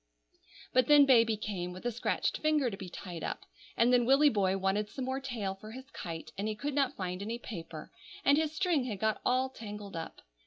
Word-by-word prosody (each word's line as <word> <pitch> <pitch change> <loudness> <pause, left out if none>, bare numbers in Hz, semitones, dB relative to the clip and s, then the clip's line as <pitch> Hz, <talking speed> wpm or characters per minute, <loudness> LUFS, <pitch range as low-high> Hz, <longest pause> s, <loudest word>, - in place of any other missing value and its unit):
But 255 -1 +4
then 295 -1 +8
baby 230 -4 +5
came, 180 -4 -4
with 185 +5 -10
a 240 - +1
scratched 235 - -1
finger 300 -5 +2
to - - -4
be 190 -2 -8
tied 175 -1 -7
up, - - -4 0.3
and 240 +2 +4
then 245 -1 +5
Willy 275 +4 +6
boy 195 -5 +1
wanted 195 +2 0
some 265 - -5
more 260 +1 -2
tail 235 -8 -3
for 215 +3 -11
his 260 +2 -10
kite, 165 -3 -6
and 205 - -1
he 215 - -2
could 285 +7 -3
not 275 -1 +1
find 180 -1 -4
any 225 +3 -3
paper, 165 -9 -8 0.3
and 280 - +6
his 310 0 +1
string 330 -5 +1
had 210 -6 -4
got 220 0 0
all 255 +1 +2
tangled 210 -5 -8
up. 165 0 -6
225 Hz, 220 wpm, -31 LUFS, 195-265 Hz, 0.3 s, then